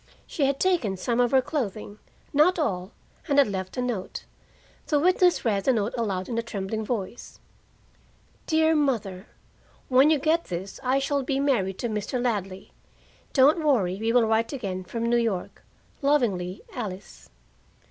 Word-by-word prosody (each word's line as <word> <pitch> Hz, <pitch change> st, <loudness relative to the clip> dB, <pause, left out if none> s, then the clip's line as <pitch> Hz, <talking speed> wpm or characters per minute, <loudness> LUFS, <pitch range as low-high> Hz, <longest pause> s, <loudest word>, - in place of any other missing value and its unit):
She 280 Hz, -4 st, 0 dB
had 275 Hz, 0 st, -1 dB
taken 320 Hz, -, +1 dB
some 235 Hz, +6 st, -1 dB
of 245 Hz, -1 st, +4 dB
her 265 Hz, 0 st, +3 dB
clothing 215 Hz, -7 st, -4 dB, 0.3 s
not 310 Hz, +6 st, +4 dB
all, 195 Hz, -, -2 dB, 0.4 s
and 285 Hz, -3 st, +1 dB
had 280 Hz, -, +6 dB
left 190 Hz, 0 st, -5 dB
a 250 Hz, -, 0 dB
note. 225 Hz, -7 st, -4 dB, 0.6 s
The 295 Hz, -, +2 dB
witness 360 Hz, 0 st, +3 dB
read 200 Hz, -4 st, +1 dB
the 265 Hz, -, +4 dB
note 215 Hz, -1 st, -1 dB
aloud 195 Hz, -6 st, -2 dB
in 230 Hz, -1 st, -2 dB
a -, -, +1 dB
trembling 220 Hz, -1 st, -4 dB
voice: 220 Hz, 0 st, -5 dB, 1.1 s
"DEAR 320 Hz, 0 st, +3 dB
MOTHER: 220 Hz, -10 st, -1 dB, 0.6 s
When 265 Hz, +3 st, +5 dB
you 315 Hz, -, +4 dB
get 320 Hz, +4 st, +1 dB
this 185 Hz, +2 st, -6 dB
I 260 Hz, +1 st, +1 dB
shall 280 Hz, +1 st, 0 dB
be 270 Hz, +1 st, -1 dB
married 215 Hz, -10 st, +1 dB
to 240 Hz, -, -2 dB
Mr. 215 Hz, +3 st, -3 dB
Ladley. 195 Hz, -6 st, -3 dB, 0.6 s
Don't 295 Hz, +4 st, +4 dB
worry. 205 Hz, -11 st, +2 dB
Will 245 Hz, 0 st, +4 dB
write 225 Hz, +1 st, +1 dB
again 195 Hz, -9 st, -4 dB
from 230 Hz, +5 st, -2 dB
N.Y. 225 Hz, -6 st, 0 dB, 0.5 s
Lovingly, 210 Hz, -11 st, 0 dB
"ALICE." 200 Hz, -5 st, -7 dB
235 Hz, 155 wpm, -26 LUFS, 195-280 Hz, 1.1 s, had